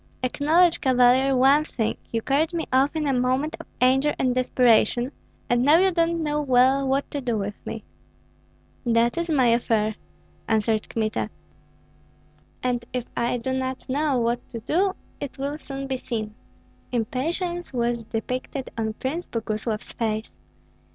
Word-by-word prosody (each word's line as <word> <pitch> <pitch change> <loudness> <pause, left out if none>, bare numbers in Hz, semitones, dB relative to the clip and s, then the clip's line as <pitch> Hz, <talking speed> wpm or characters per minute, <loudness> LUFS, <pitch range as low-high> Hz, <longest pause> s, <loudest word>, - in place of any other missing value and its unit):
Acknowledge, 320 +7 +3
Cavalier, 260 +1 +4
one 275 +4 +5
thing: 225 -7 -2 0.2
you 230 -1 -1
carried 310 +5 +1
me 330 - -1
off 270 +4 +3
in 310 -1 -1
a 275 - +1
moment 255 +4 0
of - - -10
anger 265 +4 +3
and 255 -1 +1
desperation, 250 0 +3 0.4
and 240 0 +2
now 290 +5 +6
you 380 +2 +4
don't 335 -1 +1
know 300 0 0
well 265 0 +3
what 270 +1 0
to 285 - -3
do 240 -3 -1
with 205 0 -3
me." 225 -1 -5 1.0
"That 235 0 +2
is 340 0 -2
my 275 -5 +3
affair!" 225 -2 +2 0.5
answered 220 0 +1
Kmita; 220 -1 -1 1.3
"and 245 -1 0
if 250 -2 -3
I 240 +1 0
do 260 +2 -3
not 260 0 -3
know 285 +1 +1
what 235 0 +1
to 230 - -6
do, 370 - +1 0.2
it 285 - -6
will 285 +3 -3
soon 275 -2 -6
be 265 -1 -2
seen." 220 -4 -4 0.6
Impatience 330 - -2
was 235 -2 -1
depicted 255 +4 -4
on 220 -1 -2
Prince 290 +10 -4
Boguslav's 215 -1 -3
face. 220 -1 -3
255 Hz, 150 wpm, -24 LUFS, 235-285 Hz, 1.3 s, now